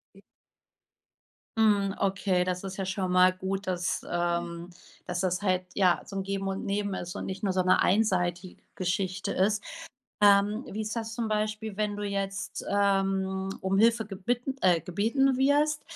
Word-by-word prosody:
I - - -16 1.4
Mhm, 205 -3 +3
okay, 190 -2 +1
das 180 0 -2
ist 195 -1 -6
ja 195 - -2
schon 185 0 -2
mal 185 0 +5
gut, 190 +1 -4
dass, 180 -1 -1
ähm 175 0 -2 0.4
dass 175 0 -3
das 180 0 0
halt, 185 -2 +1
ja, 185 -3 +3
so 195 - -9
'n 195 - -1
Geben 195 0 -3
und 195 0 -3
Nehmen 200 0 -1
ist 175 -1 -5
und - - -4
nicht 190 +1 -6
nur 195 - +2
so 185 0 +1
'ne 185 0 +3
einseitige 180 -3 +1
Geschichte 185 0 -2
ist. 205 +2 +1 0.6
Ähm, 205 +3 +5
wie 215 - -4
ist 215 +2 -4
das 225 0 -4
zum 230 -2 -2
Beispiel, 215 0 -2
wenn 210 -1 -1
du 205 - -5
jetzt, 195 -1 -3
ähm, 195 -1 +1
um 190 +1 0
Hilfe 225 +1 +4
gebitten 240 +7 -3
äh, 180 -3 +4
gebeten 230 - +1
wirst, 290 +3 +2
195 Hz, 170 wpm, -28 LUFS, 185-210 Hz, 1.4 s, mal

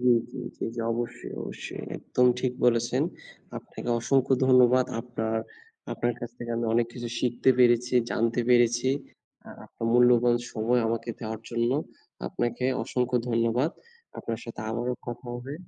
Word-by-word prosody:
জ্বী, 125 0 +5 0.2
জ্বী, 130 - -7 0.2
জ্বী। - - -2 0.3
অবশ্যই, 120 +1 -4
অবশ্যই। - - -7
একদম 125 0 +1
ঠিক 125 0 0
বলেছেন। 120 -1 +3 0.6
আপনাকে - - -9
অসংখ্য 135 +2 +2
ধন্যবাদ। 125 0 +6 0.2
আপনার 110 -2 -3 0.6
আপনার 120 0 -1
কাছ 120 - -5
থেকে 120 -1 -6
আমি 115 - -1
অনেক 120 0 +3
কিছু 120 -1 -5
শিখতে 125 +1 +2
পেরেছি, 125 0 +4 0.2
জানতে 115 +2 +1
পেরেছি। 120 +1 +4 0.6
আর - - -10
আপনার 115 - -6
মূল্যবান 120 0 +5 0.2
সময় 120 +3 +1
আমাকে 115 +1 -2
দেওয়ার 110 -1 -5
জন্য 120 0 +1 0.6
আপনাকে 120 +1 -2 0.2
অসংখ্য 125 0 0
ধন্যবাদ। 115 +6 +1 0.5
আপনার 115 -1 -4
সাথে 115 -2 -8
আবারও 120 +2 -1
কথা 120 +1 -6
হবে। 130 +4 -6
120 Hz, 140 wpm, -27 LUFS, 115-125 Hz, 0.6 s, ধন্যবাদ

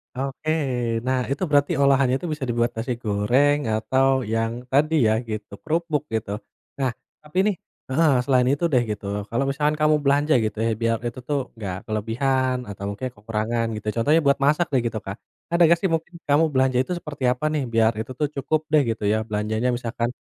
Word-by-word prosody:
Oke, 135 +4 -3 0.5
nah 130 0 +1
itu 150 - -1
berarti 145 -1 +3
olahannya 135 -2 +4
itu 175 - -6
bisa 150 -3 -4
dibuat 120 0 +1
nasi 120 +3 -2
goreng 120 +8 +3 0.2
atau 130 +5 +2 0.3
yang 115 0 0 0.2
tadi 150 +4 +3
ya, 110 - +3 0.2
gitu, 105 -1 -5
kerupuk 160 -1 0
gitu. 110 -2 -2 0.5
Nah, 130 -2 +1 0.3
tapi 150 +4 -9
nih 205 - +1 0.4
heeh, 155 +2 +4
selain 125 -1 +3
itu 145 +4 -1
deh 125 -2 +4
gitu, 105 -1 -6 0.2
kalau 120 +4 0
misalkan 150 +2 +1
kamu 155 0 +4
belanja 145 +2 +3
gitu 110 0 -3
ya 115 - +1
biar 115 0 +2
itu 120 - -6
tuh 145 - +1 0.2
gak 95 -2 -3
kelebihan 125 +4 0
atau 100 -1 -8
mungkin 115 +6 -4
kekurangan 110 +2 -2
gitu, 105 - -9
contohnya 145 +8 +3
buat 140 - +3
masak 150 +4 +3
deh 130 - +3
gitu 110 -1 -3
Kak. 100 - -5 0.4
Ada 170 +1 +2
gak 170 0 +4
sih 190 - +1
mungkin 165 +2 -3
kamu 145 +3 +4
belanja 130 -1 +2
itu 180 - -8
seperti 150 -5 -8
apa 130 +5 -3
nih 150 -3 0
biar 115 0 +4
itu 110 +3 -5
tuh 150 - +2
cukup 150 +3 0
deh 150 - +6
gitu 110 - -5
ya 110 - +2
belanjanya, 110 +3 -1
misalkan 120 0 -2
130 Hz, 195 wpm, -23 LUFS, 115-150 Hz, 0.5 s, deh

